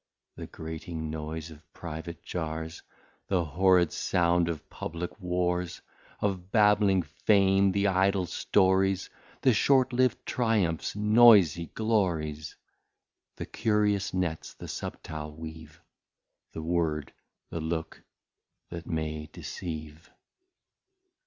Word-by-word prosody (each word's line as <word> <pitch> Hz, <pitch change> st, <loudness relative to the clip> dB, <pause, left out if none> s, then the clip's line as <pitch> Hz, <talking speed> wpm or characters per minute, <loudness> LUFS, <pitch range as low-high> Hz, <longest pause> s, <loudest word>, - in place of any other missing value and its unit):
The -, -, -7 dB
grating 80 Hz, 0 st, -6 dB
Noise 80 Hz, +1 st, -5 dB
of 75 Hz, 0 st, -16 dB
Private 85 Hz, 0 st, -7 dB
Jars, 80 Hz, -1 st, -4 dB, 0.5 s
The 90 Hz, -3 st, +1 dB
horrid 90 Hz, 0 st, +3 dB
sound 85 Hz, -1 st, +1 dB
of 80 Hz, -3 st, -5 dB
Publick 85 Hz, +5 st, -6 dB
Wars, 90 Hz, -1 st, -1 dB, 0.4 s
Of 95 Hz, -3 st, -2 dB
babling 105 Hz, -4 st, +4 dB
Fame 95 Hz, 0 st, +3 dB
the 100 Hz, +1 st, +1 dB
Idle 95 Hz, 0 st, +2 dB
Stories, 95 Hz, +1 st, +2 dB, 0.3 s
The 130 Hz, -, +4 dB
short 130 Hz, +2 st, +3 dB
liv'd 130 Hz, +1 st, +1 dB
Triumphs 105 Hz, -11 st, 0 dB
Noysy 105 Hz, -6 st, +6 dB
Glories, 85 Hz, -9 st, -1 dB, 0.8 s
The -, -, -5 dB
Curious 105 Hz, -3 st, +1 dB
Nets 90 Hz, -4 st, -3 dB
the -, -, -9 dB
subtile 75 Hz, -1 st, -6 dB
weave, 80 Hz, 0 st, -10 dB, 0.7 s
The 80 Hz, -, -5 dB
Word, 80 Hz, -3 st, -1 dB, 0.4 s
the 85 Hz, -, -3 dB
Look 80 Hz, 0 st, -4 dB, 0.7 s
that 85 Hz, -1 st, -7 dB
may 80 Hz, -2 st, -3 dB
deceive. 80 Hz, -2 st, -7 dB
85 Hz, 105 wpm, -28 LUFS, 80-100 Hz, 0.8 s, Noysy